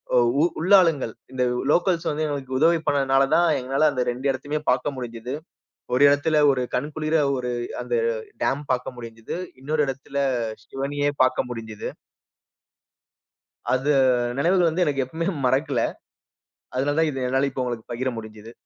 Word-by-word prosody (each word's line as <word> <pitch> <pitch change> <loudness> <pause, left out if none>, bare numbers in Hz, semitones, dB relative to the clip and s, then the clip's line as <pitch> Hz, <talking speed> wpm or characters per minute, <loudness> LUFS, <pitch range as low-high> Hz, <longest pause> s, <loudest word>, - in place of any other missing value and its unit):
ஒ - - +6 0.2
உ - - +5 0.2
உள்ளாளுங்கள், 165 - +4 0.2
இந்த 125 - 0 0.2
உ - - -1
லோக்கல்ஸ் 175 -2 +2
வந்து 155 +1 -1
எங்களுக்கு 135 -3 -3
உதவி 165 +2 +4
பண்ணனால 135 -1 +3
தான் 175 +1 +4
எங்களால 135 +4 +2
அந்த 125 -2 0
2 125 +3 -7
இடத்தையுமே 145 +3 -3
பாக்க - - 0
முடிஞ்சுது. 125 +1 -5 0.6
ஒரு 130 - +3
இடத்தில 145 +2 +2 0.2
ஒரு 130 -2 -1
கண்குளிர 155 +3 -1 0.2
ஒரு 125 -1 -3 0.3
அந்த 120 0 -3 0.5
டேம் 140 +2 0
பாக்க 125 0 -2
முடிஞ்சுது. 115 +1 -7 0.3
இன்னொரு 150 +3 -1
இடத்தில 135 +1 -5 0.5
சிவனயே 145 +3 -2 0.2
பாக்க 130 0 +1
முடிஞ்சுது. 110 -3 -6 1.8
அத 130 +3 0 0.5
நினைவுகள் 175 +3 +3
வந்து 180 +2 +1
எனக்கு 140 -2 0
எப்பவுமே 165 +7 -3 0.2
மறக்கல 135 0 +1 0.9
அதனால 140 +3 0
தான் 160 -1 +3
இது 135 -2 -3
என்னால 135 +2 +2
இப்ப 130 - -3
உங்களுக்கு 120 -3 -5
பகிர 130 +2 -2
முடிஞ்சுது. 110 +1 -10
135 Hz, 145 wpm, -24 LUFS, 125-150 Hz, 1.8 s, ஒ